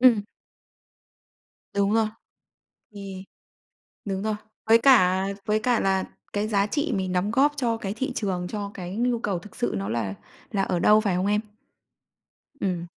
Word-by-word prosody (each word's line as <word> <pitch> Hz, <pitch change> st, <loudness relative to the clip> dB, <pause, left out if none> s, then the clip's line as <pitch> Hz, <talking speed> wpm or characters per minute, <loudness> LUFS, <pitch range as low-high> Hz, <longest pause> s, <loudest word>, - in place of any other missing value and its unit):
Ừm. 245 Hz, -5 st, +6 dB, 1.5 s
Đúng 200 Hz, +1 st, +2 dB
rồi. 225 Hz, -1 st, +3 dB, 0.9 s
Thì 195 Hz, -2 st, -7 dB, 0.8 s
đúng 195 Hz, -1 st, -2 dB
rồi. 215 Hz, 0 st, 0 dB, 0.3 s
Với 225 Hz, +1 st, +7 dB
cả 190 Hz, -7 st, +5 dB, 0.2 s
với 215 Hz, 0 st, +2 dB
cả 240 Hz, 0 st, +2 dB
là 190 Hz, -1 st, +2 dB, 0.3 s
cái 205 Hz, +1 st, -1 dB
giá 200 Hz, -2 st, +2 dB
trị 290 Hz, +5 st, -1 dB
mình 185 Hz, -1 st, -1 dB
đóng 185 Hz, +3 st, +1 dB
góp 275 Hz, +5 st, +4 dB
cho 235 Hz, -4 st, 0 dB
cái 200 Hz, -2 st, -4 dB
thị 265 Hz, +3 st, -2 dB
trường, 185 Hz, -6 st, -2 dB
cho 205 Hz, 0 st, -4 dB
cái 180 Hz, +1 st, -6 dB
nhu 240 Hz, +1 st, +1 dB
cầu 200 Hz, -5 st, -1 dB
thực 205 Hz, +4 st, -13 dB
sự 240 Hz, -, -1 dB
nó 100 Hz, +1 st, -3 dB
là 110 Hz, -4 st, -2 dB, 0.4 s
là 195 Hz, -, +1 dB
ở 180 Hz, -2 st, 0 dB
đâu, 210 Hz, +4 st, +6 dB
phải 200 Hz, -5 st, 0 dB
không 185 Hz, +2 st, 0 dB
em? 210 Hz, +1 st, +2 dB, 1.2 s
Ừm. 180 Hz, -3 st, -1 dB
205 Hz, 165 wpm, -25 LUFS, 190-225 Hz, 1.5 s, Với